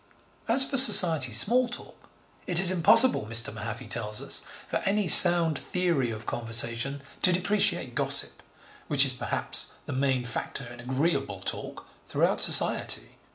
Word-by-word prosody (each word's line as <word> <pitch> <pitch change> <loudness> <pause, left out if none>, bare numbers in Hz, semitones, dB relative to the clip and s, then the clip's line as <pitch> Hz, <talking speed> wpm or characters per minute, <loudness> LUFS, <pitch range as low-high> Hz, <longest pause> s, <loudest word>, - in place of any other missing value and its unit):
As 265 +4 +3
for 275 - -4
Society 165 - +4
small 235 - +2
talk, 240 - -10 0.4
it 175 -1 +2
is 185 -1 +2
impossible, 210 - +2
Mr. 115 0 +1
Mahaffy 110 +3 -9
tells 105 -1 -4
us, - - -3 0.3
for - - -5
any 200 0 -3
sound 170 -3 +6
theory 170 -9 -4
of 110 0 -10
conversation 120 +4 -4 0.2
to 185 - +4
depreciate 185 +4 -2
gossip, - - +4 0.5
'which 140 -2 +3
is 130 - +3
perhaps 125 - 0
the - - -8
main 130 -1 -3
factor 125 +2 -7
in 120 +1 -14
agreeable 130 +7 -4
talk - - -9 0.2
throughout - - -3
Society.' - - +2
140 Hz, 145 wpm, -24 LUFS, 120-185 Hz, 0.5 s, sound